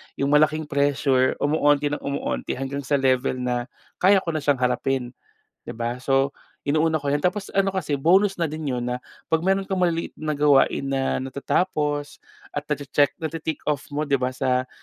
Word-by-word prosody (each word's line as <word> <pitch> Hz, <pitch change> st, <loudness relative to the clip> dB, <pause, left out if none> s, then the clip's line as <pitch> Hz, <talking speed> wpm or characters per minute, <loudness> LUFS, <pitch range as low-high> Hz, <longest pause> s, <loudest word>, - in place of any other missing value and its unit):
yung 140 Hz, +1 st, 0 dB
malaking 155 Hz, +1 st, +4 dB
pressure 140 Hz, -2 st, +2 dB
kumukonti 145 Hz, -1 st, +2 dB
ng 145 Hz, -, -2 dB
kumukonti 140 Hz, 0 st, -3 dB
hanggang 135 Hz, +1 st, -4 dB
sa 140 Hz, +1 st, 0 dB
level 130 Hz, -1 st, +2 dB
na 125 Hz, 0 st, -2 dB, 0.3 s
kaya 195 Hz, +2 st, +6 dB
ko 165 Hz, -, -2 dB
na 155 Hz, -, -1 dB
siyang 145 Hz, 0 st, +2 dB
harapin 125 Hz, 0 st, 0 dB, 0.5 s
di -, -, -6 dB
ba? 120 Hz, +1 st, -3 dB
So, 135 Hz, 0 st, +2 dB, 0.4 s
inuuna 155 Hz, +2 st, +2 dB
ko 140 Hz, -, -4 dB
iyan 145 Hz, +3 st, 0 dB
tapos 195 Hz, +2 st, 0 dB
ano 195 Hz, 0 st, +3 dB
kasi 150 Hz, -7 st, -1 dB
bonus 190 Hz, +7 st, +3 dB
na 170 Hz, -, 0 dB
din 155 Hz, -1 st, -4 dB
'yun 125 Hz, -2 st, -2 dB
na 125 Hz, 0 st, -3 dB, 0.3 s
pag 160 Hz, -, +4 dB
meron 195 Hz, +3 st, +1 dB
kang 190 Hz, -1 st, -2 dB
maliliit 170 Hz, -2 st, 0 dB
na 155 Hz, -1 st, -2 dB
gawain 140 Hz, -1 st, +3 dB
na 135 Hz, -1 st, 0 dB
natatapos 145 Hz, +2 st, -1 dB, 0.3 s
at 145 Hz, -, -3 dB
na-che-check 145 Hz, -1 st, +1 dB
nati-tick 160 Hz, -1 st, -4 dB
off 145 Hz, -3 st, -2 dB
mo 150 Hz, +1 st, -2 dB
di 140 Hz, -3 st, +1 dB
ba 125 Hz, -, +1 dB
sa 130 Hz, 0 st, 0 dB
145 Hz, 180 wpm, -24 LUFS, 135-155 Hz, 0.5 s, kaya